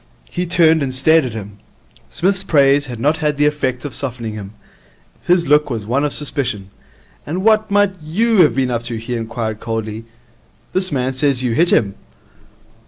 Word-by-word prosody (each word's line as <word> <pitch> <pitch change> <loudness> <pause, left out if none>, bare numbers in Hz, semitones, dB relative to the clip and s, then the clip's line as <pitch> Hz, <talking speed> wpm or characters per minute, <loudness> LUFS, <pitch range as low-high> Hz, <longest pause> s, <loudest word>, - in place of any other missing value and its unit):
He 180 0 -3
turned 165 -3 +4
and 130 -2 -2
stared 155 +3 +4
at 120 - -5
him. 105 -2 -8 0.5
Psmith's 195 +2 0
praise 145 -4 +3
had 120 -3 -7
not 150 +6 +1
had 150 -2 -1
the 145 - +2
effect 130 -4 -1
of 145 - -5
softening 120 -4 -4
him. 100 -1 -8 0.7
His 175 -1 +3
look 150 +1 +3
was 115 -5 -4
one 130 +6 0
of 150 - 0
suspicion. 125 -10 -2 0.5
'And 180 +5 -4
what 215 0 +3
might 205 -1 +2
you 215 +9 0
have 155 - +4
been 130 -2 0
up 120 -1 -1
to?' 120 -1 -4
he 115 +2 -5
inquired 115 -1 -4
coldly. 110 -1 -5 0.7
'This 185 -1 +2
man 130 -1 -1
says 135 -1 +1
you 125 - 0
hit 170 +7 +2
him.' 100 -3 +2
140 Hz, 180 wpm, -18 LUFS, 115-160 Hz, 0.7 s, turned